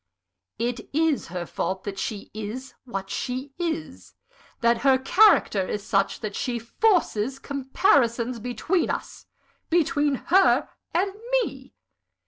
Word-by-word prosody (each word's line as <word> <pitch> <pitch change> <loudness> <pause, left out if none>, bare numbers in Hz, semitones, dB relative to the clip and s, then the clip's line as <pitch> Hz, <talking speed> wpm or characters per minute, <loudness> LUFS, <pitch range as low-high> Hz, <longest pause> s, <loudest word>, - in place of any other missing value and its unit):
"It 235 +1 -3
is 315 -1 +1
her 175 0 -4
fault 190 +3 -3
that 195 -1 -5
she 205 -3 -4
is 220 +5 -6
what 195 -5 -5
she 260 +2 -4
is! 155 - -4 0.5
that 235 0 +3
her 270 -2 +4
character 265 - +4
is 210 - -3
such 195 -2 +1
that 215 -3 -4
she 245 -2 -2
forces 260 - +1
comparisons 260 -4 +1
between 250 - -1
us - - -5 0.4
between 295 -4 +2
her 375 +8 +3 0.2
and 380 +3 0 0.3
_me! - - -8
250 Hz, 120 wpm, -25 LUFS, 210-290 Hz, 0.5 s, her